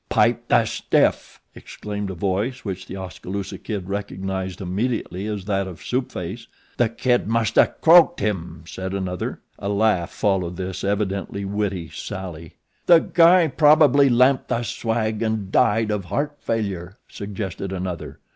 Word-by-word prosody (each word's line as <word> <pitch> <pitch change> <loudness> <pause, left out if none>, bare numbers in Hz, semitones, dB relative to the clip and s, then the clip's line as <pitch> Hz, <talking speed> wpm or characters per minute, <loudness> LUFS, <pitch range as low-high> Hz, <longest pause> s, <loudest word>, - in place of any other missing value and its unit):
"Pipe - - +2
the - - +4
stiff," - - 0
exclaimed 105 -1 -6
a 95 - -5
voice 100 +9 -2
which 95 -2 -5
The - - -7
Oskaloosa 95 +2 -6
Kid 100 -5 -5
recognized 95 -2 -4
immediately 100 0 -2
as 105 -3 -4
that 100 -2 0
of 80 -5 -10
Soup 125 +1 -2
Face. 95 +7 -6 0.3
"The 120 -2 +3
Kid 120 +1 +1
musta 115 0 +2
croaked 175 +1 +7
him," 85 -6 -3
said 95 +2 -5
another. 90 -2 -4 0.2
A 100 - -3
laugh 100 -4 +2
followed 95 -4 -1
this 95 -1 -5
evidently 100 0 -2
witty 95 -4 -2
sally. 90 -5 -7 0.3
"The 175 - +9
guy 170 +1 +5
probably 145 -2 +5
lamped 130 +2 +3
the 120 - -1
swag 110 -1 -2
an' 110 -3 -1
died 110 0 +3
of 105 -3 -2
heart 145 +9 -2
failure," 100 -5 -3
suggested 100 -1 -5
another. 90 -4 -5
100 Hz, 145 wpm, -22 LUFS, 95-115 Hz, 0.3 s, The